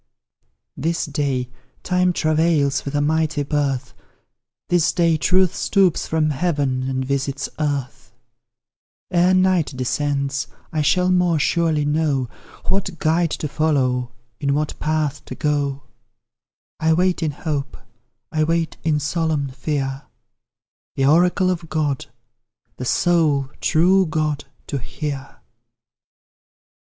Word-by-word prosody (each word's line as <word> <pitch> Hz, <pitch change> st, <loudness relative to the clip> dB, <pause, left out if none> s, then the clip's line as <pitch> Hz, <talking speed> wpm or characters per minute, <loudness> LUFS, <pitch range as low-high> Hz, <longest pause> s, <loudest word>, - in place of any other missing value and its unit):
This 165 Hz, +2 st, -1 dB
day, 140 Hz, -4 st, -2 dB, 0.3 s
Time 180 Hz, 0 st, +2 dB
travails 155 Hz, -4 st, +1 dB
with 140 Hz, +1 st, -4 dB
a 145 Hz, -, +2 dB
mighty 155 Hz, 0 st, +1 dB
birth; 140 Hz, -3 st, -1 dB, 0.7 s
This 175 Hz, -3 st, +3 dB
day, 170 Hz, -2 st, +3 dB
Truth 185 Hz, +2 st, +3 dB
stoops 195 Hz, -4 st, +2 dB
from 155 Hz, -1 st, +1 dB
heaven 135 Hz, -4 st, 0 dB
and 130 Hz, 0 st, -1 dB
visits 140 Hz, +1 st, -2 dB
earth; 140 Hz, -5 st, -3 dB, 1.0 s
Ere 180 Hz, +1 st, +4 dB
night 185 Hz, -4 st, +3 dB
descends 140 Hz, 0 st, -1 dB, 0.3 s
I 155 Hz, -, +1 dB
shall 180 Hz, +4 st, +3 dB
more 180 Hz, -2 st, +3 dB
surely 160 Hz, -1 st, +1 dB
know 145 Hz, -4 st, +1 dB, 0.4 s
What 190 Hz, -2 st, -1 dB
guide 165 Hz, +2 st, +2 dB
to 150 Hz, -, -3 dB
follow, 130 Hz, -5 st, 0 dB, 0.3 s
in 140 Hz, -1 st, +1 dB
what 150 Hz, 0 st, -2 dB
path 150 Hz, -2 st, -1 dB
to -, -, -7 dB
go; 140 Hz, -2 st, -1 dB, 1.0 s
I 160 Hz, 0 st, +3 dB
wait 180 Hz, +2 st, +2 dB
in 160 Hz, -, +1 dB
hope 145 Hz, -1 st, -4 dB, 0.5 s
I 155 Hz, -1 st, +1 dB
wait 165 Hz, 0 st, 0 dB
in 155 Hz, -2 st, +2 dB
solemn 155 Hz, -2 st, -1 dB
fear, 135 Hz, 0 st, -3 dB, 0.9 s
The 135 Hz, -, +1 dB
oracle 180 Hz, +5 st, +4 dB
of 170 Hz, -3 st, -4 dB
God 150 Hz, -3 st, -1 dB, 0.7 s
the 125 Hz, -, -5 dB
sole 150 Hz, -4 st, +2 dB
true 185 Hz, +3 st, +3 dB
God 155 Hz, -2 st, -1 dB, 0.2 s
to 140 Hz, -, -3 dB
hear. 140 Hz, +2 st, -6 dB
150 Hz, 120 wpm, -21 LUFS, 140-165 Hz, 1.0 s, Ere